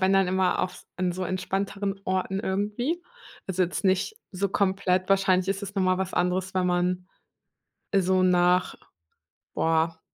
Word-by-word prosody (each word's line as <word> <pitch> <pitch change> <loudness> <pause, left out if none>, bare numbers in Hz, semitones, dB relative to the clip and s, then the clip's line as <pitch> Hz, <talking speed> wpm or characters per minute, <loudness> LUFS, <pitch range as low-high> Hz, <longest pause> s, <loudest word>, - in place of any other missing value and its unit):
wenn 190 +1 +3
dann 195 -1 +4
immer 185 -1 +2
auf 180 - -5
an 180 -1 0
so 185 +1 -3
entspannteren 195 +2 -2
Orten 190 +1 -1
irgendwie. 210 - -1 0.4
Also, 190 -1 0
jetzt 180 +3 -2
nicht 190 - +1 0.2
so 195 +2 -1
komplett 190 -1 +1
wahrscheinlich 190 -1 +3
ist 195 +1 -1
es 200 +1 -6
noch 195 - +1
mal 185 0 +2
was 190 0 -2
anderes, 185 +1 0
wenn 185 -1 +1
man, 180 +1 0 0.8
äh, 195 - +3
so 185 0 +2
nach, 180 0 +3 0.8
boah 165 0 +1
185 Hz, 160 wpm, -26 LUFS, 180-195 Hz, 0.8 s, dann